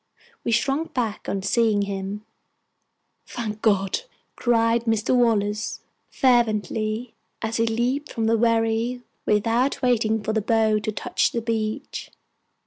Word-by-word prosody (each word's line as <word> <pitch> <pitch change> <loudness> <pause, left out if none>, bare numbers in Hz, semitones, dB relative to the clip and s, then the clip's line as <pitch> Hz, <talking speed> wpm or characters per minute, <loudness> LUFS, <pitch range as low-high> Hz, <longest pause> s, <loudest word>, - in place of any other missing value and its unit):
We 235 - -1
shrunk 275 +7 0
back 230 -5 -2
on 195 -1 -2
seeing 215 0 +2
him. 200 +1 -4 1.0
"Thank 215 -3 -5
God!" 195 - +2 0.4
cried 230 -1 +2
Mr. 225 +2 +1
Wallace, 215 -3 +1 0.3
fervently, 225 -2 +1 0.3
as 225 0 -1
he 230 0 +2
leaped 245 +6 -1
from 225 - -1
the 225 +1 +3
wherry 230 +2 +1 0.2
without 230 +6 +1
waiting 220 -3 +2
for 220 - -1
the 220 - +1
bow 220 -1 +2
to 215 +1 -3
touch 205 - 0
the 235 - -1
beach. 225 +3 -3
225 Hz, 130 wpm, -24 LUFS, 215-235 Hz, 1.0 s, the